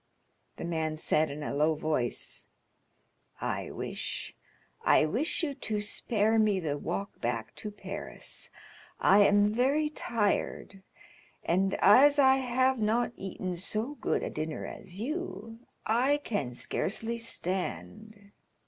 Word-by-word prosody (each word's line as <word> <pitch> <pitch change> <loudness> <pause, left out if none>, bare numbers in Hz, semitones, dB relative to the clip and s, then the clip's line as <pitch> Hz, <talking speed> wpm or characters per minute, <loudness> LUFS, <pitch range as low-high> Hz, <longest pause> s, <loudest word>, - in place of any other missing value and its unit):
The - - -5
man 160 -2 -2
said, 155 0 +2
in 150 +1 -6
a - - -3
low 155 +2 +2
voice: 150 -6 -2 0.9
"I - - -3
wish—I - - -2
wish 260 - 0
you 290 -3 0
to 220 -6 -3
spare 215 +1 +1
me 210 -3 +3
the 155 -5 -2
walk 175 +7 -4
back 115 -2 -2
to 210 - -4
Paris. 200 -1 -6 0.5
I 200 - +6
am 205 +1 +5
very 280 +6 +2
tired, 205 -5 -1 0.6
and 190 +3 +1
as 280 +8 +6
I 265 -1 +6
have 260 0 +1
not 225 +3 +1
eaten 185 -1 -4
so 215 +9 -1
good - - 0
a - - -3
dinner 155 0 -4
as 185 +1 -9
you, 225 - -5 0.3
I 255 +6 +3
can 140 - -2
scarcely 225 - -2
stand." 205 0 -4
205 Hz, 125 wpm, -30 LUFS, 170-235 Hz, 0.9 s, I